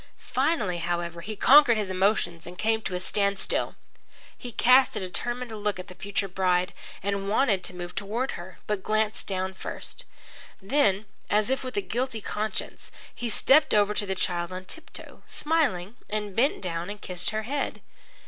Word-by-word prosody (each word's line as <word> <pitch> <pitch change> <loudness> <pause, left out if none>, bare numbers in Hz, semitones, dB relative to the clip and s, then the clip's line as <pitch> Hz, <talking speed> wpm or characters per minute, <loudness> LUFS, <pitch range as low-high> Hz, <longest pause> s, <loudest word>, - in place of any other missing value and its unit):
Finally, 255 - 0
however, 170 0 -2
he 215 +5 -5
conquered 260 +1 +7
his 205 -3 -1
emotions 185 -3 +1
and 180 +1 -9
came 220 +2 +1
to 190 -3 -3
a - - -1
standstill. 200 +1 +1 0.6
He 245 - -8
cast 255 +3 +5
a - - -1
determined 240 +6 -3
look 210 -2 -1
at 185 +1 -8
the - - -9
future 195 +1 -2
bride 180 -1 +1 0.3
and 200 0 -1
wanted 210 -4 +2
to 180 - -6
move 175 0 -6
toward 230 +7 -2
her, 175 +1 -8
but 210 -2 -1
glanced 215 +1 0
about 190 0 -2
first. - - -6 0.5
Then, 205 -2 +2 0.2
as 210 +4 +2
if 265 0 0
with 255 +6 -5
a - - +3
guilty 255 - -2
conscience, 215 +1 -4 0.2
he 240 - -4
stepped 275 +6 +5
over 210 0 +4
to 205 -1 -1
the 190 - -1
child 175 -1 -1
on 185 0 -6
tip 320 - -11
toe, - - -11
smiling, 250 - 0
and 210 -2 -2
bent 255 -1 +2
down 170 0 -3
and 205 0 -6
kissed 180 -2 -1
her 215 0 -2
head. 280 +5 -2
205 Hz, 175 wpm, -27 LUFS, 185-235 Hz, 0.6 s, conquered